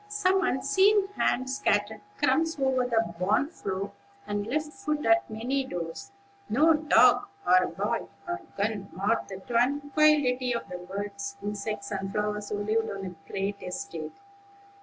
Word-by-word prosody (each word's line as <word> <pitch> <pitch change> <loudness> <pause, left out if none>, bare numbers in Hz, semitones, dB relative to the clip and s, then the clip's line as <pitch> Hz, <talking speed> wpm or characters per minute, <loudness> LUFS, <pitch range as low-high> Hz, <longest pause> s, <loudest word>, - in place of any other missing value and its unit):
Some 385 -2 +2
unseen 385 +8 +3
hand 260 -10 0
scattered 220 -5 0 0.2
crumbs 325 0 +2
over 260 -2 +2
the 225 -7 +1
barn 205 +10 +2
floor, 195 - -4 0.3
and 205 0 -2
left 300 +4 -2
food 295 +3 -2
at 340 +1 +4
many 245 +5 -1
doors. 175 - -6 0.4
No 310 +8 +5
dog 310 +6 +5 0.2
or 185 0 +5
boy - - -2 0.2
or 350 0 -3 0.2
gun 200 -1 -1
marred 200 +6 0
the 190 - -6
tranquillity 265 +1 +2
of 235 - -4
the 180 - -6
birds, 200 +2 -5
insects, 205 0 -4
and 195 -1 -3
flowers 210 0 -2
who 205 - -2
lived 220 +2 0
on 195 -1 -5
the 185 -2 -5 0.2
great 200 +1 -2
estate. 400 - -6
230 Hz, 145 wpm, -28 LUFS, 200-295 Hz, 0.4 s, No